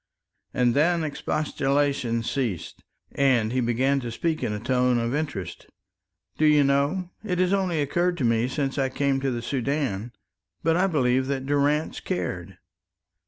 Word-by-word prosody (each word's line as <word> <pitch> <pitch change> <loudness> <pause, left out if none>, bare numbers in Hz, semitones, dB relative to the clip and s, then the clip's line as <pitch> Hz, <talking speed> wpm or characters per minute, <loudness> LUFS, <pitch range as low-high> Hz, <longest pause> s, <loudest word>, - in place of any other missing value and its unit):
And 125 -1 +2
then 165 +4 +2
expostulation 140 -5 0
ceased, 115 - -3 0.3
and 125 -5 +2
he 130 - +1
began 130 +4 +1
to 120 -3 -5
speak 160 +7 -2
in 120 -4 -1
a 105 - -3
tone 125 +1 +2
of 115 +1 -1
interest. 145 - -4 0.7
"Do 155 - +4
you 150 -1 +5
know, 140 +7 +1
it 185 -4 -2
has 185 +1 +2
only 185 -5 +1
occurred 175 +5 0
to 140 - -2
me 115 0 +2
since 135 +1 -2
I 135 -1 +1
came 135 0 0
to 135 0 -1
the 120 -2 -3
Soudan, 125 -4 -2 0.5
but 165 0 +3
I 185 +3 +3
believe 130 -6 +1
that 135 -1 -2
Durrance 145 +2 +1
cared." 90 +1 -4
135 Hz, 160 wpm, -25 LUFS, 120-150 Hz, 0.7 s, you